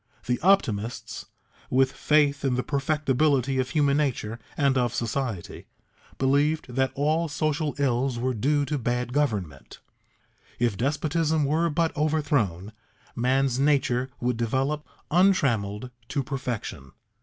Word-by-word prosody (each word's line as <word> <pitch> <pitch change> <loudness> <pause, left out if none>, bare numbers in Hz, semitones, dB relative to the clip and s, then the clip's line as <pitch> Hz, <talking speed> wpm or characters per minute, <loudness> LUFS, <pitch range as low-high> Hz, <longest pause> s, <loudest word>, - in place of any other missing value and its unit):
The 125 0 0
optimists, 125 - 0 0.4
with 130 +1 +3
faith 145 -2 +2
in 135 -2 +1
the 125 - -1
perfectability 140 -2 +1
of 130 - -4
human 145 -1 +2
nature 120 -6 -1 0.2
and 140 -2 +3
of 125 -2 +1
society, 115 -5 -3 0.5
believed 140 +1 +1
that 130 +1 +1
all 155 +4 +1
social 155 -1 -1
ills 130 -2 0
were 130 +2 -1
due 145 +6 +1
to 145 +1 -2
bad 125 +1 -2
government; 100 - -2 0.8
if 120 -4 +1
despotism 155 - 0
were 160 +4 +1
but 165 +1 0
overthrown, 145 - 0 0.4
man's 130 +1 +1
nature 135 -3 +2
would 125 -1 -1
develop, 135 +6 -1 0.2
untrammeled, 130 - +2 0.2
to 140 +1 -2
perfection. 125 - -5
135 Hz, 120 wpm, -26 LUFS, 120-150 Hz, 0.8 s, with